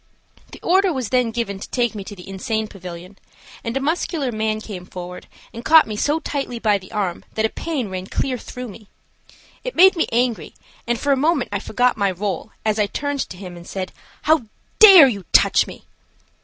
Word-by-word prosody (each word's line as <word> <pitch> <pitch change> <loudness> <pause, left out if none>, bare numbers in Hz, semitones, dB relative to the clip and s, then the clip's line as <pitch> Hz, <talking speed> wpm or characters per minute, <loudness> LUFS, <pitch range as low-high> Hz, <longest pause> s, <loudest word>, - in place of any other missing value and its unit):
The - - -11
order 380 +2 +3
was 260 -7 -3
then 250 -2 +2
given 225 -4 -3
to - - -8
take 240 -3 0
me 205 -2 -6
to 205 - -8
the 180 - -12
insane 215 +3 -2
pavilion, 180 0 -10 0.4
and 235 +3 -2
a - - +1
muscular 300 -2 -1
man 215 -1 -1
came 200 -4 -8
forward 180 -1 -8 0.3
and 230 - -8
caught 320 +2 +7
me 215 - -5
so 295 +9 +1
tightly 275 -6 -4
by 210 -3 +2
the 185 - -15
arm 195 -5 -2
that 220 - +1
a - - +1
pain 290 -6 -3
ran 185 -1 -6
clear 255 +2 -2
through 250 +1 -8
me. 210 +1 -13 0.8
It - - -5
made 380 +2 +7
me 330 - +1
angry, 240 -1 0 0.3
and 240 -1 0
for 285 - 0
a - - +5
moment 295 0 +1
I 205 - 0
forgot 245 +4 +1
my 200 -2 +2
role 195 +3 -3 0.2
as 215 0 +1
I 210 - +2
turned 285 +5 -3
to 180 - -9
him 180 -2 -9
and 175 0 -12
said: 190 -1 -5 0.3
"How 310 -7 +3 0.3
dare 385 -9 +10
you 205 -6 -3
touch - - +5
me?" - - -11
225 Hz, 210 wpm, -21 LUFS, 200-275 Hz, 0.8 s, dare